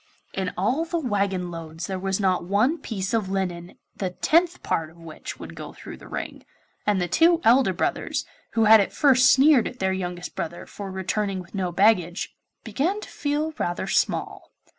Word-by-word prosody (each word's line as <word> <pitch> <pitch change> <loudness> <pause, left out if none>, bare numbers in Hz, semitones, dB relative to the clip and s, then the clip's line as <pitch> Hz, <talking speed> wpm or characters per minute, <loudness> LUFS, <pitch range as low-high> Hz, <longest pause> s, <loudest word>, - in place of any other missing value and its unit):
In 190 -1 -2
all 240 - +1
the 335 +1 -2
waggon 200 - -1
loads 165 0 -6
there 190 -1 -4
was 195 +1 -1
not 185 -3 +1
one 215 - +1
piece 195 -3 -4
of 215 -4 0
linen 180 -3 -3 0.2
the 190 - -2
tenth 335 - +1
part 160 -1 -1
of 165 - -19
which 165 -2 -8
would - - -8
go - - -8
through - - -10
the - - -13
ring, - - -6 0.4
and 205 -2 +3
the 180 - 0
two 330 - +4
elder 235 -3 +5
brothers, 185 - -2 0.3
who 225 - +3
had 220 +1 +8
at 195 - -2
first 260 -2 +5
sneered 270 -2 +5
at 250 - -8
their 190 -3 0
youngest 180 -1 -5
brother 170 +1 -5
for 200 -1 -8
returning 190 +1 -2
with 175 -2 -11
no 185 -3 -1
baggage, 180 -2 +2 0.3
began 305 - -1
to - - -9
feel 300 +2 -2
rather 175 +2 -1
small. 195 - -1
195 Hz, 185 wpm, -24 LUFS, 180-255 Hz, 0.4 s, had